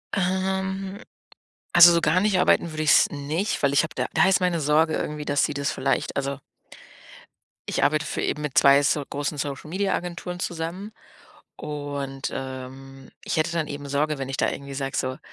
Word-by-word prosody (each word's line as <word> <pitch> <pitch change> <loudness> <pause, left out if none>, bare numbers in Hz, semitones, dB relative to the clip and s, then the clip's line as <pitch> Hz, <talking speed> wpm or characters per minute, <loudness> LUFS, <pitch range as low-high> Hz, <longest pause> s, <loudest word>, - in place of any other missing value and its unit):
Ähm, 190 +1 -2 0.7
also, 175 0 +9
so 170 - +3
gar 160 +3 +2
nicht 200 -1 +2
arbeiten 170 - +3
würde 155 0 -3
ich's 155 - +5
nicht, 150 +7 -2
weil 140 -1 +3
ich 140 - +4
habe 160 - -6
da - - -1
da 190 - +4
ist 190 - +3
meine 180 -2 +1
Sorge 155 +2 +2
irgendwie, 150 0 -3
dass 145 -1 +1
sie - - -2
das 140 0 -1
vielleicht, 135 +1 -1
also 140 0 -2 1.3
ich - - -1
arbeite 155 +2 +2
für - - -3
eben 150 - -2
mit 150 -3 -4
2 140 +1 +6
so 145 +1 +1
großen 145 +2 -4
Social 145 +1 -5
Media 195 +3 -1
Agenturen 175 0 -5
zusammen 175 +4 -4 0.7
und, 145 -2 -5
ähm, 135 0 -8
ich - - -3
hätte 160 +2 +1
dann 165 -2 -1
eben 145 0 -6
Sorge, 150 +2 0
wenn 135 -1 -4
ich 135 - -4
da - - +2
irgendwie 140 0 -7
sage, 135 0 -3
so, 130 0 -2
150 Hz, 190 wpm, -24 LUFS, 140-175 Hz, 1.3 s, also